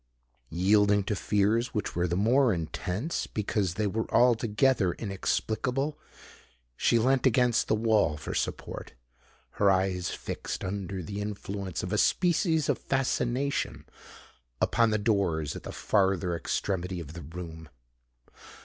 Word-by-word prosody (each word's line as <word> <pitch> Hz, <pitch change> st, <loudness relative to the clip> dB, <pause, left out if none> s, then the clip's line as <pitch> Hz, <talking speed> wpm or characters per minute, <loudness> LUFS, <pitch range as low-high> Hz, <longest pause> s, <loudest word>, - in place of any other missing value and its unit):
Yielding 100 Hz, +3 st, +3 dB
to 105 Hz, +2 st, -2 dB
fears 105 Hz, +5 st, +1 dB
which 105 Hz, -, -2 dB
were 85 Hz, +1 st, +1 dB
the 85 Hz, -, -1 dB
more 120 Hz, +6 st, +4 dB
intense 90 Hz, -, -3 dB
because 100 Hz, -4 st, -1 dB
they 105 Hz, -, 0 dB
were 110 Hz, +3 st, -2 dB
altogether 115 Hz, -3 st, +3 dB
inexplicable, 120 Hz, +7 st, -2 dB, 0.8 s
she 120 Hz, -, +3 dB
leant 130 Hz, +3 st, +3 dB
against 125 Hz, -1 st, +3 dB
the -, -, +2 dB
wall 110 Hz, -8 st, +2 dB
for 75 Hz, -, -6 dB
support—her -, -, -4 dB
eyes 95 Hz, -2 st, +1 dB
fixed, -, -, -5 dB
under 95 Hz, -1 st, -4 dB
the 100 Hz, +5 st, -5 dB
influence 100 Hz, -4 st, -4 dB
of 90 Hz, +3 st, -3 dB
a 105 Hz, -, +2 dB
species 165 Hz, -3 st, +2 dB
of -, -, +1 dB
fascination, 135 Hz, 0 st, -1 dB, 0.7 s
upon 115 Hz, -1 st, +3 dB
the 110 Hz, -, +1 dB
doors 95 Hz, -9 st, 0 dB
at -, -, -6 dB
the -, -, -7 dB
farther 95 Hz, -4 st, +1 dB
extremity 90 Hz, +1 st, -2 dB
of 80 Hz, -2 st, -8 dB
the 85 Hz, -, -8 dB
room. 80 Hz, 0 st, -8 dB
100 Hz, 130 wpm, -28 LUFS, 90-115 Hz, 0.8 s, more